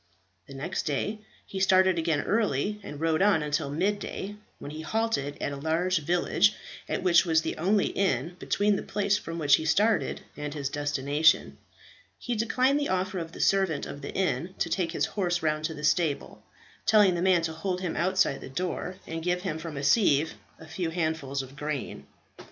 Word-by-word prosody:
The 140 - -10
next 140 +5 -3
day 205 +9 -1 0.3
he 195 - -6
started 190 -2 +4
again 160 -3 +1
early, 210 -2 0
and 145 -6 -8
rode 160 +1 +1
on 195 -6 +4
until 150 -1 -1
mid 190 +8 0
day, 205 0 -6 0.2
when 145 - -8
he 155 +1 -6
halted 160 -6 -1
at - - -2
a - - -4
large 165 +4 +1
village, 175 +6 +2 0.3
at - - -2
which 175 -2 +5
was 160 -3 +2
the - - -2
only 195 +4 +2
inn 170 -3 0
between 205 0 +1
the - - -3
place 205 0 0
from 165 0 -6
which 145 -3 +5
he - - -4
started 210 +7 +2
and 150 0 -5
his 140 -2 -2
destination. 145 +2 +1 0.6
He 245 - -3
declined 255 +5 +2
the 285 - -1
offer 185 +1 -1
of 165 -1 -6
the - - -10
servant 190 -7 +2
of 140 - -8
the 140 - -6
inn 185 -1 -1
to - - -1
take 175 -4 0
his - - 0
horse 175 -4 -1
round 155 0 0
to 160 - -3
the 150 - -9
stable, 155 -2 0 0.5
telling 210 -4 +6
the 170 - -2
man 180 -2 +3
to 160 -1 -2
hold 180 +3 -3
him 180 -3 -3
outside 185 -4 +1
the - - -8
door 180 +4 -3
and 165 0 -5
give 180 +1 -1
him 160 -5 -3
from 160 -3 -6
a 140 - -4
sieve 155 -3 +3 0.3
a 160 - -11
few 170 +1 -3
handfuls 160 -5 -2
of 130 +1 -12
grain. 150 -2 -5
170 Hz, 195 wpm, -28 LUFS, 150-190 Hz, 0.6 s, telling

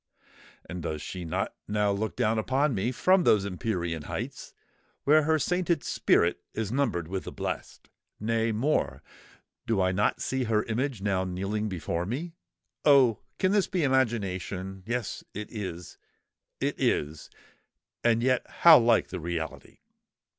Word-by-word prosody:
And 90 +1 -6
does 80 -1 -3
she 90 +3 -6
not 80 - -2
now 105 -1 +1
look 105 +2 -2
down 115 -2 +1
upon 135 +5 +1
me 105 +4 0
from 185 +8 +3
those 105 -9 +4
empyrean 90 -4 -2
heights - - -5 0.5
where 150 +1 +5
her 160 0 +3
sainted 175 0 0
spirit 85 +1 +2
is 110 -2 -2
numbered 120 - 0
with 95 +2 -4
the - - -6
blest? - - -5 0.3
Nay, 115 +1 0
more; 130 +8 0 0.6
do 115 -3 +1
I 95 -1 +3
not 100 +3 +1
see 130 -1 -1
her 110 -1 +1
image 120 -1 -2
now 95 -2 +1
kneeling 100 +4 -2
before 85 -1 -3
me? 155 - -4 0.5
Oh! 135 -6 +5 0.2
can 185 - +2
this 205 -2 +3
be 180 -5 -1
imagination? 95 -7 -1
Yes—it 110 -3 -4
is,—it 95 -6 -7
is,—and 115 +9 -2
yet 130 -1 +2
how 165 -4 +8
like 115 -1 +3
the - - -5
reality!" 80 -1 -5
110 Hz, 140 wpm, -28 LUFS, 95-130 Hz, 0.6 s, how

